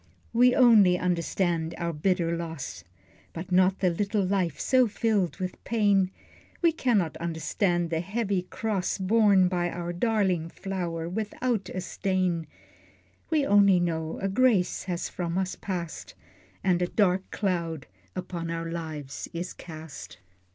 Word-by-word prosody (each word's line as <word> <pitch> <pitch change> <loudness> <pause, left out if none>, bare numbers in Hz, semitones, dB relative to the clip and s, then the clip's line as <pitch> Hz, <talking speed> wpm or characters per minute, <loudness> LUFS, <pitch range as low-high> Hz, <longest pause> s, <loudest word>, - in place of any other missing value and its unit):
We 245 +1 +5
only 215 -8 +6
understand 170 -2 0
our 170 0 -2
bitter 170 +1 +1
loss, 165 -4 -6 0.5
But 170 +3 -7
not 185 +1 +4
the 185 -2 +3
little 200 +3 0
life 180 -6 0
so 255 -2 +4
filled 210 -4 0
with 185 -1 -5
pain, 205 -4 +2 0.5
We 335 - +6
cannot 225 - +1
understand 170 +1 -1
the 160 - +1
heavy 200 +1 -1
cross 195 0 -2
Borne 195 -1 +4
by 175 -1 0
our 175 0 -4
darling 185 -5 +1
flower 170 -3 -4
without 215 +2 -2
a 185 - -4
stain: 185 -3 -1 0.8
We 310 -3 +2
only 200 -5 +5
know 160 -2 -2
a 195 - -1
grace 205 -2 +2
has 175 -2 -2
from 175 -1 -3
us 190 0 -1
passed, 175 -4 -5 0.5
And 180 -2 +2
a 180 - +2
dark 190 -1 +1
cloud 170 - -2 0.3
upon 175 -2 -4
our 165 0 -3
lives 155 -5 -6
is 175 +2 -4
cast. 160 -3 -10
180 Hz, 135 wpm, -27 LUFS, 170-200 Hz, 0.8 s, only